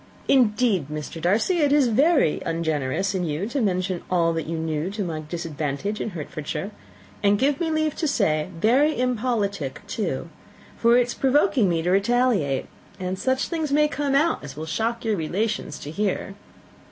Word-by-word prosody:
Indeed, 215 - +3
Mr. 150 +2 -6
Darcy, 220 - +2
it 290 -2 +3
is 285 -3 +4
very 270 - +3
ungenerous 160 +2 -1
in 185 -2 -1
you 160 +3 -2
to 275 +1 -1
mention 185 -3 0
all 170 -2 +2
that 165 -2 -3
you 165 0 -3
knew 160 +1 -2
to 205 +1 -3
my 165 -4 -3
disadvantage 165 +3 -3
in - - -2
Hertfordshire 155 +6 -5 0.5
and, 205 0 +4
give 275 +4 +1
me 335 -2 0
leave 310 -1 0
to 320 - 0
say, 160 - +1
very 265 - +3
impolitic 215 - -1
too 180 -7 -3 0.5
for 235 +1 +4
it 250 - +4
is 240 - -5
provoking 270 - +3
me 165 -2 0
to 180 - +1
retaliate, 200 - +2 0.3
and 185 0 -3
such 260 0 0
things 320 -4 -2
may 300 +1 +4
come 285 -2 -1
out 315 - +2
as 145 -1 -9
will 155 - -4
shock 230 +8 -2
your 220 -2 +1
relations 180 -1 -2
to 145 - -7
hear." 195 +1 -2
200 Hz, 175 wpm, -24 LUFS, 165-255 Hz, 0.5 s, is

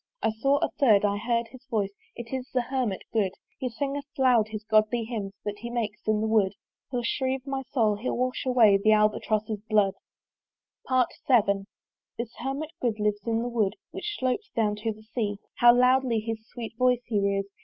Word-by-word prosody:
I - - +3
saw 275 +6 +2
a - - +2
third 215 -7 +5
I 205 0 +1
heard 235 +1 -1
his 260 0 -15
voice: 205 -6 -1 0.2
It 235 +1 -8
is 260 0 -3
the 255 - +1
Hermit 245 -6 -2
good! 200 -4 +1 0.3
He 260 -2 -2
singeth 280 +4 -3
loud 250 -5 +4
his 215 0 -6
godly 215 +2 +2
hymns 215 -4 -4
That 205 0 -4
he 235 +2 -6
makes 220 -4 -4
in 215 -1 +2
the 220 - 0
wood. 210 -3 +2 0.3
He'll 245 -2 -2
shrieve 260 +1 -1
my 270 -1 -2
soul, 220 -6 +2
he'll 240 +4 -2
wash 255 +1 -1
away 235 -6 +5
The 215 - +6
Albatross's 215 0 +1
blood. 205 -3 +3 1.0
VII. 230 -5 +2 0.5
This 235 0 -5
Hermit 275 +5 -4
good 225 -4 0
lives 210 0 0
in 230 0 +1
that 245 - -2
wood 220 -5 0 0.2
Which 415 -1 -4
slopes 260 - -1
down 210 -2 +1
to 220 +1 -2
the 215 0 -12
Sea. 215 -2 -2 0.2
How 240 0 +8
loudly 250 -1 +3
his 220 0 -5
sweet 235 -2 -7
voice 250 -1 +3
he 220 -4 0
rears! 200 0 +1
230 Hz, 190 wpm, -27 LUFS, 210-255 Hz, 1.0 s, How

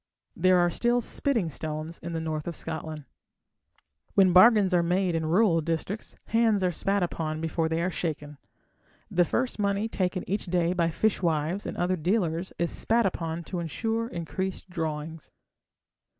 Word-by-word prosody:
There 185 +1 +4
are 175 0 +3
still 240 +6 +2
"spitting 240 -4 0
stones" 155 +2 -5
in 170 +1 -6
the 165 - -1
north 155 -1 -3
of 170 - -4
Scotland. 160 -2 -6 1.1
When 190 -3 +5
bargains 200 0 +7
are 175 - +4
made 180 +1 +1
in 160 -1 -1
rural 175 -1 +3
districts, 165 +6 -3
hands 225 -4 +2
are 180 - +2
spat 195 +3 0
upon 155 -2 -3
before 160 0 -1
they 165 +1 0
are 185 - 0
shaken. 150 -4 -4 0.7
The 175 0 +3
first 245 +5 -1
money 200 +1 +1
taken 185 -4 -2
each 200 +2 -2
day 175 0 +1
by 170 -2 +1
fishwives 170 -2 0
and - - -5
other 180 +1 +1
dealers 175 0 0
is 170 0 0
spat 230 0 +1
upon 165 -2 -2
to 180 +2 -5
ensure 225 +7 -2
increased 185 0 -5
drawings. 160 -2 -4
175 Hz, 160 wpm, -27 LUFS, 160-195 Hz, 1.1 s, bargains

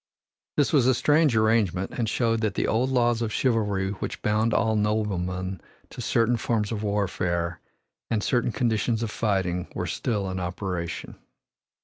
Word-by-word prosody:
This 145 - +2
was 135 -5 +4
a 130 - +4
strange 150 0 +3
agreement 110 -4 +2
and 115 -3 -2
showed 115 -1 +1
that 105 -3 0
the - - +1
old 120 +4 +1
laws 120 -2 +2
of 115 -2 -1
chivalry 105 -6 +1
which 100 - -5
bound 110 +2 +2
all 110 -1 +2
noblemen 95 -4 -1 0.3
to - - -7
certain 115 +1 +2
forms 110 -2 -1
of 105 -2 -2
warfare 90 -4 -1 0.5
and 110 -2 0
certain 120 -2 +1
conditions 115 -1 0
of 110 - -3
fighting 95 -6 -1
were - - -2
still 105 -5 -2
in 95 - -3
operation. 90 -1 -4
110 Hz, 155 wpm, -26 LUFS, 95-115 Hz, 0.5 s, was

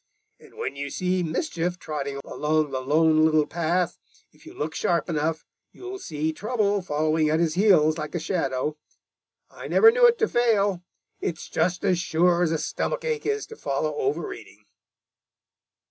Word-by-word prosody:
And - - -18
when - - -4
you 140 0 -4
see 185 +4 -1
Mischief 175 - -2
trotting 140 -4 -5
along 155 -1 0
the 130 -1 -2
Lone 155 +3 +3
Little 155 -1 +4
Path, 170 +2 -1 0.3
if 150 - -20
you - - -12
look 155 +2 -3
sharp 170 +1 0
enough, 160 0 -1 0.3
you'll 380 +1 -8
see 155 - -3
Trouble 205 0 0
following 155 -1 +1
at 155 +1 +2
his 165 -2 +1
heels 170 -5 +4
like 155 +3 -5
a - - 0
shadow. 155 -3 -2 0.7
I - - -9
never 450 0 +6
knew 485 +1 +6
it 475 0 +3
to 440 - +2
fail. 205 - +2 0.4
It's 160 -3 -4
just 180 +2 -1
as 185 -3 +2
sure 175 0 +2
as 170 -3 +2
a 160 - +1
stomach - - -3
ache 460 -2 -2
is 425 0 -1
to 445 - -11
follow 150 - -2
overeating." 135 -7 -4
165 Hz, 165 wpm, -25 LUFS, 155-190 Hz, 0.7 s, never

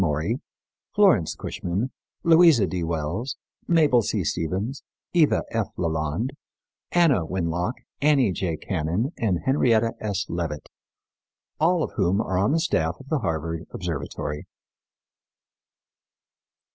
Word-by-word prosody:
Maury, 80 - 0 0.5
Florence 185 - +4
Cushman, 100 +9 -3 0.3
Louisa 165 - +6
D. 90 0 -3
Wells, 85 - -2 0.3
Mabel 150 -8 +4
C. 105 -3 -1
Stephens, 95 - -2 0.3
Eva 165 -4 +4
F. 115 -3 0
Leland, 80 - -1 0.6
Anna 160 - +4
Winlock, 90 +4 -1 0.3
Annie 140 -7 +4
J. 85 -2 -2
Cannon 90 - -1
and 95 -7 +1
Henrietta 115 -4 +3
S. 100 -2 -2
Leavitt, 80 -4 -4 0.9
all 165 +1 +3
of - - -3
whom 95 -1 +2
are 95 -4 0
on 100 +7 +2
the 165 - +2
staff 80 - 0
of 135 - -13
the 155 - +1
Harvard 80 -4 -3
Observatory. 75 0 -4
100 Hz, 115 wpm, -25 LUFS, 85-135 Hz, 0.9 s, Louisa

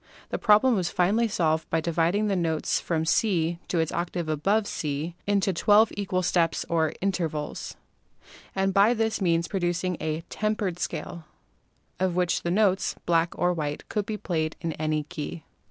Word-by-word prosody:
The - - -3
problem 240 +3 +5
was 180 -4 0
finally 210 +6 +2
solved 160 -6 0
by 165 - +1
dividing 170 +5 +1
the 200 -2 +1
notes 165 -3 0
from 160 -2 -1
C 170 -1 +1
to 175 - -1
its 160 -1 +1
octave 175 -1 -3
above 195 +8 +1
(C) 150 -1 -3
into 200 -1 +2
twelve 210 +5 +4
equal 185 -2 -1
steps 170 -2 +1
or 160 -2 +1
intervals, 165 -6 -2 0.8
and 195 0 +1
by 205 +5 +5
this 220 -1 0
means 170 -2 +2
pro 195 - -2
ducing 175 0 -1
a 155 +1 -2
"tempered" 210 -4 -2
scale 170 -1 -4 0.7
of 185 -2 0
which 180 -1 +1
the 170 - -2
notes, 190 0 +2
black 170 0 +1
or 180 0 +2
white, 150 -3 -4
could 210 -2 -2
be 215 - -3
played 160 -5 -2
in 165 -2 -3
any 155 0 -1
key. 150 +2 -6
175 Hz, 170 wpm, -26 LUFS, 160-200 Hz, 0.8 s, problem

